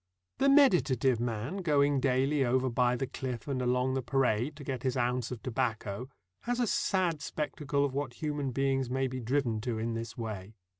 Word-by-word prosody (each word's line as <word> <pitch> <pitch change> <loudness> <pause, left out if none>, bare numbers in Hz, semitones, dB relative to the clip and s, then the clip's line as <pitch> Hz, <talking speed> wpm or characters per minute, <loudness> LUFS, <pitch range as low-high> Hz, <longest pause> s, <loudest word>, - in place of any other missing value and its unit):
The 275 +1 +4
meditative 155 - +4
man 120 - -2
going 145 -6 +2
daily 135 +2 +2
over 130 +1 +1
by 125 +1 +2
the 135 - -1
cliff 130 -1 -5
and 135 -2 -1
along 125 +1 +1
the 130 - 0
parade, 130 +1 +1
to 145 - -10
get 130 -3 -3
his 130 -1 -1
ounce 125 0 0
of 125 -3 -7
tobacco, 115 -2 -2 0.3
has 245 +1 -2
a 245 - +3
sad 180 -7 +1
spectacle 145 -1 -1
of 135 - -3
what 140 -3 -2
human 145 -2 -2
beings 135 0 0
may 135 +1 0
be 130 0 -3
driven 120 -2 0
to 115 -1 -2
in 115 +1 -2
this 115 -1 -5
way. 110 -3 -6
130 Hz, 190 wpm, -30 LUFS, 120-145 Hz, 0.3 s, The